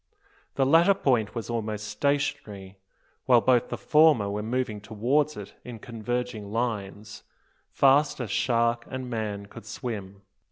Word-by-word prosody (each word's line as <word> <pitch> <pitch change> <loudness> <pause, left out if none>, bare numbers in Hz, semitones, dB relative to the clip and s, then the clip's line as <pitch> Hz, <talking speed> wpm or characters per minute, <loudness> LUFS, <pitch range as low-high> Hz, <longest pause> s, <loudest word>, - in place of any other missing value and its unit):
The 135 - +2
latter 165 +8 +5
point 125 - 0
was 115 - -4
almost 110 -3 -3
stationary, 105 -6 -2 0.5
while 125 -2 +6
both 125 0 +2
the - - -4
former 150 -10 +4
were 105 +1 -3
moving 110 -2 -2
towards 125 +9 0
it 100 -1 -9
in 120 -2 -8
converging 115 -1 -4
lines, 105 -3 -4 0.5
fast 140 +2 +3
as 120 -6 -4
shark 115 0 +1
and 130 -1 -6
man 105 -3 -3
could 100 +1 -13
swim. 100 -5 -6
115 Hz, 135 wpm, -26 LUFS, 105-130 Hz, 0.5 s, while